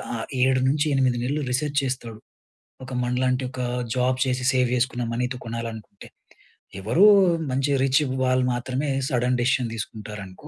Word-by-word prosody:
ఆ - - -3 0.3
7 130 0 +3
నుంచి 150 +3 +1
8 130 -2 +2
నెలలు 145 +4 -1
రిసర్చ్ 145 +3 -1
చేస్తాడు. 120 -4 -4 0.7
ఒక 130 - -8
మనలాంటి 125 +1 0
ఒక 125 - -5 0.3
జాబ్ 125 0 +1
చేసి, 125 -1 -1
సేవ్ 125 -1 +2
చేసుకున్న 125 0 -1
మనీతో 125 +1 -2
కొనాలనుకుంటే. 115 -3 -7 0.7
ఎవరో 140 - +4 0.5
మంచి 135 +2 0
రిచ్ 135 +3 +3 0.2
వాళ్ళు 130 0 +2
మాత్రమే, 130 +4 -2 0.2
సడన్ 125 0 +1
డిసిషన్ 125 -1 +1
తీసుకుంటారనుకో. 105 -3 -8
125 Hz, 140 wpm, -24 LUFS, 120-130 Hz, 0.7 s, ఎవరో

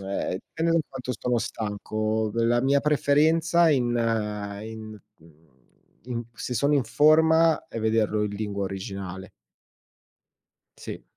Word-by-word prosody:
uhm, 95 -1 -3 0.2
pende 165 +1 0
da 165 - +4
quanto 130 -1 -6
stono 125 -1 -1
stanco. 110 0 -2
V - - -10
la 120 +1 +3
mia 140 +1 +3
preferenza 160 +3 +3
in 130 -5 +2 0.7
in 110 -1 -9 0.2
mhmm, 80 -1 -22 0.6
in 120 -2 -4
se 125 - -5
sono 140 +6 +2
in 140 - +3
forma, 160 +3 +4
è 115 - -6
vederlo 110 -1 +1
in 105 - -4
lingua 100 -1 -3
originale. 95 -1 -6 1.5
Sì. - - -8
115 Hz, 130 wpm, -25 LUFS, 105-145 Hz, 1.5 s, da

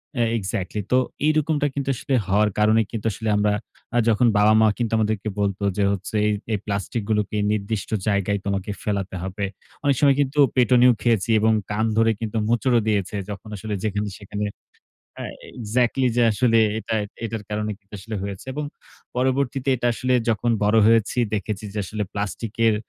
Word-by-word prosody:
হ্যাঁ 120 -3 +2
এক্সাক্টলি 95 0 -3
তো 125 - +5 0.3
এইরকমটা 155 -1 +2
কিন্তু 140 0 -3
আসলে 135 - -3
হওয়ার 105 +2 +3
কারণে 110 +1 +4
কিন্তু 115 -2 -5
আসলে 110 +3 -3
আমরা 105 0 +2 0.5
যখন 115 +2 +4
বাবা-মা 110 +1 +5 0.3
আমাদেরকে 110 -1 0
বলত 100 -2 0 0.2
যে 100 - +2
হচ্ছে 100 +2 -4
এ - - +3 0.2
এই 105 - 0
প্লাস্টিক 100 +3 -2
গুলোকে 105 -1 0
নির্দিষ্ট 105 -1 -2 0.2
জায়গায় 100 -1 +1
তোমাকে 100 0 -2
ফেলাতে 100 -2 -2
হবে। 95 +2 -3 0.4
অনেক 140 -1 +3
সময় 140 -2 +5
কিন্তু 140 +1 -1 0.2
পেটুনিও 125 0 +5
খেয়েছি 115 -3 +1
এবং 110 +1 +3 0.2
কান 105 +2 +1
ধরে 115 0 +4
কিন্তু 115 -1 -3
মোচড় 120 +2 +2
ও - - -1
দিয়েছে 105 -2 0
যখন 105 +1 -7
আসলে 105 +1 -5
যেখানে-সেখানে, 105 0 -3 0.7
হ্যাঁ - - -6 0.3
এক্সাক্টলি 120 +3 +1
যে - - +5
আসলে 115 +1 +3 0.2
এটা 110 0 -3 0.3
এটার 115 -1 -4
কারণে 105 0 -2
কিন্তু 100 +1 -26
আসলে 110 +3 -6
হয়েছে। 100 -1 -6
এবং 150 +2 -3 0.5
পরবর্তীতে 130 +1 0
এটা 120 0 -1
আসলে 130 +2 0 0.2
যখন 115 +1 +1
বড় 105 +2 +3
হয়েছি 115 +1 +3 0.2
দেখেছি 105 0 -3
যে, - - -6
আসলে 105 +2 -3
প্লাস্টিক 105 +2 -4
এর 110 - +4
110 Hz, 165 wpm, -23 LUFS, 105-120 Hz, 0.7 s, তো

